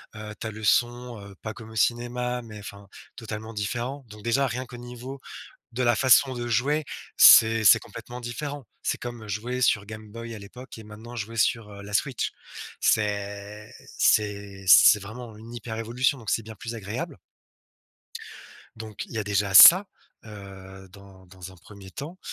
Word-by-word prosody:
heu, 105 0 -8
tu - - -5
as - - -5
le 110 0 -10
son, 120 +1 0
heu, 100 -1 -12
pas 110 -1 -6
comme 110 -1 -12
au 110 - -13
cinéma, 125 +2 -1
mais 110 -3 -11
enfin, 100 -1 -11 0.3
totalement 110 -1 -7
différent. 120 +7 -4
Donc 105 0 -13
déjà 120 +4 +1
rien 130 +1 -4
qu'au 125 - -12
niveau 125 +2 -9 0.5
de 125 +2 -2
la 120 -1 +3
façon 130 +1 +4
de 120 -1 -5
jouer, 145 +6 0 0.3
c'est 115 0 +8
c'est - - +8
complètement 125 +1 -10
différent. 140 +4 -6 0.2
C'est - - -1
comme, 120 -2 -8
heu, - - -12
jouer 120 +5 -4
sur 105 -4 +2
Game 110 +1 -10
Boy 115 +1 -8
à 110 - -8
l'époque 115 +5 -12
et - - -10
maintenant 110 +3 -11
jouer 115 0 -6
sur, 110 -1 0
heu, 100 0 -11
la 100 +1 -10
Switch. 130 +4 -1 0.5
C'est 105 +1 -2 0.3
c'est 100 -2 +1
c'est 105 +3 +8
vraiment 110 +2 -10
une 115 +2 -12
hyper 115 -1 -7
révolution, 120 +5 0
donc 115 -5 -6
c'est 115 - 0
bien 110 +1 -10
plus 115 +3 -7
agréable 105 -1 -6 1.6
donc 110 -2 -8
il - - -14
y - - -4
a - - -2
déjà 100 -1 -1
ça, 185 - +10 0.4
heu, 95 -2 -12
dans 95 -1 -16
dans 95 0 -11
un - - -16
1er 95 +2 -14
temps. 155 - -8
110 Hz, 185 wpm, -25 LUFS, 105-120 Hz, 1.6 s, ça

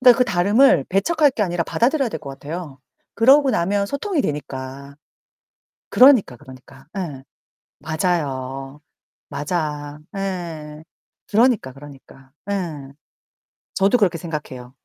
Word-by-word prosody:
그러니까 250 -2 +7
그 250 - +4
다름을 200 - +4
배척할 290 - +3
게 230 -5 -2
아니라 175 -3 0
받아들여야 270 +2 +1
될 160 - -5
것 140 - -9
같아요. 145 +1 -7 0.4
그러고 270 +4 +5
나면 200 0 0
소통이 295 - -2
되니까. 140 - -6 0.9
그러니까, 250 - +6
그러니까. 130 0 -15
예. 145 -7 -5 0.6
맞아요. 140 -4 -3 0.5
맞아. 150 -2 -3 0.2
예. 165 -6 -5 0.5
그러니까, 220 - +2
그러니까. 135 -1 -15 0.2
예. 155 -8 -4 0.8
저도 195 +5 +3
그렇게 185 -7 +2
생각해요. 135 -7 -7
165 Hz, 280 characters per minute, -21 LUFS, 140-205 Hz, 0.9 s, 그러니까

